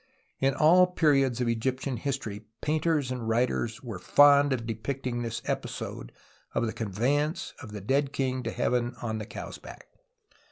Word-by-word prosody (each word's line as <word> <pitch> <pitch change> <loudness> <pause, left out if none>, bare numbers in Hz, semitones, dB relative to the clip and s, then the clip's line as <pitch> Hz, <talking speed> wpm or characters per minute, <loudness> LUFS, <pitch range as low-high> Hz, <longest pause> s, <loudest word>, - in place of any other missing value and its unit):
In 135 0 +2
all 180 +4 +6
periods 135 -8 +2
of 125 - +1
Egyptian 130 +3 -1
history 115 -5 -3 0.2
painters 155 -3 0
and 120 -3 -3
writers 120 +1 0
were 115 -7 -6
fond 145 +5 +6
of 120 -3 -1
depicting 120 +2 -3
this 115 -1 -4
episode - - -4 0.4
of - - +2
the 110 - -2
conveyance 125 - -1
of 110 - -9
the 105 -1 -6
dead 135 +7 +1
king 130 -2 -1
to 115 - -3
heaven 120 +1 0
on 110 -2 -2
the 105 - -6
cow's - - -7
back. - - -12
125 Hz, 160 wpm, -28 LUFS, 115-140 Hz, 0.4 s, all